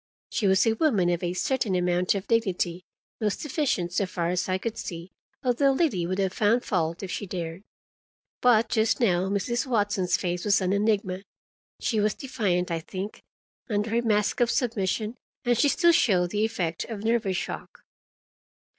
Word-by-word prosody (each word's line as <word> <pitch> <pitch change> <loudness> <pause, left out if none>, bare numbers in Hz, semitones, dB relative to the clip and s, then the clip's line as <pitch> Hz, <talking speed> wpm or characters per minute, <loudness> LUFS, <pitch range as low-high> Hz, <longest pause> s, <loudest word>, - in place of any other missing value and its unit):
She 205 - +1
was 190 +3 +4
a 225 - +3
woman 220 - +2
of 175 - -1
a 175 0 -2
certain 225 -2 0
amount 180 +1 +1
of 195 0 -3
dignity, 185 -6 0 0.4
most 215 +5 -1
efficient, 260 - -1
so 200 0 +1
far 170 -2 -2
as 180 +1 -1
I 185 - +1
could 225 +3 -4
see, 175 -5 -7 0.3
although 270 +2 +3
Liddy 265 - +1
would 185 +1 -2
have 190 -2 0
found 220 +5 +2
fault 170 -1 -1
if 190 - -5
she 205 - -4
dared. 170 -1 -5 0.8
But 230 -2 +5
just 220 0 +1
now 190 -5 +2
Mrs. 235 +6 -1
Watson's 205 -6 +1
face 175 -1 -2
was 205 +1 +3
an 185 0 0
enigma. 200 -3 0 0.6
She 220 - 0
was 210 0 +1
defiant, 185 -9 -1
I 165 - 0
think, 190 +5 -6 0.5
under 210 0 -1
her 235 +1 +2
mask 210 -3 +1
of 240 -1 +3
submission, 225 -2 -1 0.3
and 240 0 +3
she 285 +5 +3
still 345 +4 +4
showed 180 - +3
the 210 +1 +1
effect 175 -7 -2
of 215 -3 -6
nervous 220 -5 +1
shock. - - -6
205 Hz, 175 wpm, -26 LUFS, 180-230 Hz, 0.8 s, But